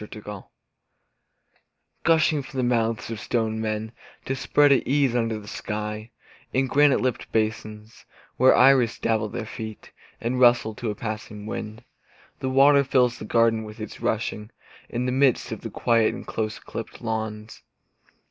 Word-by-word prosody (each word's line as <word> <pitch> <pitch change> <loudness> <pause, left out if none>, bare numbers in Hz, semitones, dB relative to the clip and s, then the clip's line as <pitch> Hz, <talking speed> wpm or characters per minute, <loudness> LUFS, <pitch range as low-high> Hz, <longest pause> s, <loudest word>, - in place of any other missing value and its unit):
In 105 - -7
a 110 - -8
Garden 105 -2 -8 1.6
Gushing 160 -2 +3
from 135 0 -10
the 130 - +1
mouths 115 -2 0
of 115 - -5
stone 110 +1 -1
men 110 0 -3 0.3
To 135 - -2
spread 145 +2 +3
at 135 - +3
ease 135 -2 +2
under 115 -2 0
the 105 - -13
sky 105 +1 -5 0.4
In 130 +1 +1
granite 145 +1 +4
lipped 130 -2 -2
basins, 110 0 -3 0.3
Where 130 +1 +5
iris 130 -3 +5
dabble 110 -1 0
their 110 +1 -5
feet 110 -1 -8 0.3
And 120 +2 -2
rustle 120 -3 +4
to 115 +1 -4
a 105 - -3
passing 105 -1 -6
wind, 110 0 -6 0.6
The 130 - -2
water 140 +2 +5
fills 125 -2 +2
the - - -7
garden 115 0 +2
with 105 +1 -10
its 110 - -8
rushing, 105 -1 -2 0.4
In 120 +1 -2
the 125 - 0
midst 130 -1 +2
of - - -5
the - - -6
quiet 115 -2 +2
of - - -9
close 110 -1 -3
clipped - - -8
lawns. 110 -1 -4
115 Hz, 165 wpm, -24 LUFS, 110-130 Hz, 1.6 s, Where